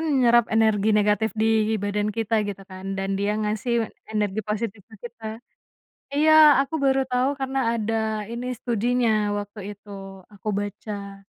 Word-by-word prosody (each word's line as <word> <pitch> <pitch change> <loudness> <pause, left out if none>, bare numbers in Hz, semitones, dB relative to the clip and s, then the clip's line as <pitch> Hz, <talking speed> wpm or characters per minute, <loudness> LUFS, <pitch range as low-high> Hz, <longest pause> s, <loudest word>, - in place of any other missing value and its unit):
nyerap 250 -7 +3
energi 220 -2 +2
negatif 210 +1 +2
di 220 0 +2
badan 205 0 -1
kita 225 +1 0
gitu 195 -1 -6
kan, 190 +1 -6
dan 195 0 -2
dia 205 +1 0
ngasih 215 +2 -1 0.2
energi 210 -1 0
positif 215 0 -3
ke 220 - -14
kita 230 -2 -11 0.9
Iya 310 +2 +4 0.3
aku 280 +4 -7
baru 270 0 +3
tahu 250 +2 +2
karena 270 0 -2 0.2
ada 225 -1 -1 0.4
ini 240 +1 -5
studinya 240 0 0 0.3
waktu 205 +1 -6
itu 205 +1 -18 0.4
aku 205 0 -8
baca. 200 -1 -7
220 Hz, 140 wpm, -24 LUFS, 205-235 Hz, 0.9 s, Iya